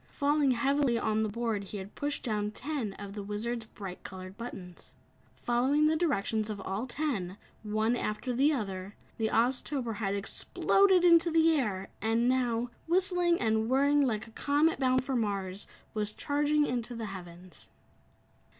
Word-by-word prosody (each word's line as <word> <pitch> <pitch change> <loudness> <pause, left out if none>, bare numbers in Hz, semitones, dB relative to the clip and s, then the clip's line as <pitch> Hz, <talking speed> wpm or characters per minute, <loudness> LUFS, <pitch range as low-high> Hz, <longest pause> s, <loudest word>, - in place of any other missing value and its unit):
Falling 290 0 +2
heavily 270 0 +2
on 220 -1 0
the 215 - 0
board 220 -2 -2
he 205 - -7
had 195 +1 -8
pushed 290 0 -3
down 210 -4 -1
ten 250 -2 -4
of 200 0 -8
the 205 - -5
Wizard's 220 +3 -4
bright 195 -4 -8
colored 185 0 -8
buttons. 190 -6 -9 0.4
Following 260 +5 +2
the 310 +1 +3
directions 225 - 0
of 210 -2 -4
all 195 +6 -3
ten, 235 - -2 0.2
one 215 +2 0
after 240 +2 -2
the 275 +5 +3
other, 195 -7 -4 0.2
the 220 - +2
Oztober 245 0 0
had 200 -2 -1
exploded 365 - +2
into 335 0 +6
the 325 0 +4
air 200 -9 -1
and 225 +3 +2
now, 245 -2 +1 0.2
whistling 355 -1 +3
and 220 -1 +1
whirling 285 +3 +4
like 225 -6 0
a 225 - -15
comet 290 +5 +1
bound 255 -1 +2
for 265 0 -2
Mars, 200 -4 -2 0.3
was 210 -1 -2
charging 295 +3 +1
into 240 -1 -3
the 230 -1 -4
Heavens. 180 -3 -10
235 Hz, 160 wpm, -30 LUFS, 210-285 Hz, 0.4 s, into